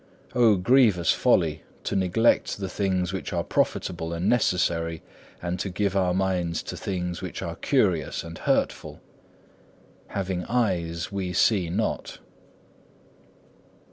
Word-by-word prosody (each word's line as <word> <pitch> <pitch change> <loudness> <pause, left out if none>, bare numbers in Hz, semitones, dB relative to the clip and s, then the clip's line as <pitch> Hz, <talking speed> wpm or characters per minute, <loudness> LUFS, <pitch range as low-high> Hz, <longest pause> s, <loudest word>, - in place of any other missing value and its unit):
Oh, 115 -4 +5
grievous 100 -3 +4
folly, 75 -2 +2 0.2
to - - -2
neglect 95 +5 +2
the 100 -1 -4
things 95 -3 -1
which 95 - -4
are - - 0
profitable 85 -2 -1
and 85 +2 -2
necessary, 85 -7 +1 0.4
and 90 +1 -2
to 100 - -2
give 100 +1 -1
our 95 -2 +2
minds 90 -3 0
to - - -6
things 90 -2 -3
which - - -5
are - - -4
curious - - +1
and 85 -1 -9
hurtful! - - -1 1.1
Having 95 -2 -3
eyes, 85 -9 -1
we 95 -2 -3
see 95 -1 +3
not. 105 +6 -2
90 Hz, 125 wpm, -26 LUFS, 85-100 Hz, 1.1 s, Oh